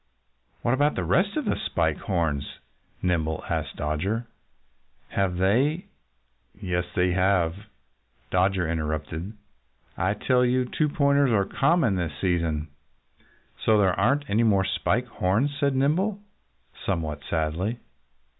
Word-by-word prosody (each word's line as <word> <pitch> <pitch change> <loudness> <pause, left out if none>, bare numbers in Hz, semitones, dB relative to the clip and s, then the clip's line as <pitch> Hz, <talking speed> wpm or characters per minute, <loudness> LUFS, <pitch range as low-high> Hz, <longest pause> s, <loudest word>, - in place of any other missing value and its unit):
"What 120 - +2
about 145 +3 +2
the - - -1
rest 200 - +1
of 300 - -1
the - - +1
Spike 80 -2 0
Horns?" 80 -7 -2 0.5
Nimble 80 -3 0
asked - - -2
Dodger. 95 +11 -2 0.8
"Have 95 -3 0
they 135 - +2 0.4
" 60 0 -45
"Yes, 90 -3 -1
they 90 0 +2
have!" 90 -2 +2 0.8
Dodger 90 -1 +2
interrupted. 80 +3 -3 0.6
"I 95 +4 0
tell 125 +4 +2
you, 125 +1 +2
'two 150 +4 0
pointers' 140 -1 +3
are 100 -4 +2
common 140 - +2
this 80 -4 -3
season." 85 -4 0 0.9
"So 110 -1 +4
there 95 -3 +3
aren't 140 +10 +1
any 105 +3 +2
more 100 -4 +3
Spike 115 +5 0
Horns!" 110 +4 0
said 140 -2 +1
Nimble 170 +10 +1 0.7
somewhat 80 -5 -2
sadly. 85 +8 -1
95 Hz, 125 wpm, -26 LUFS, 85-125 Hz, 0.9 s, So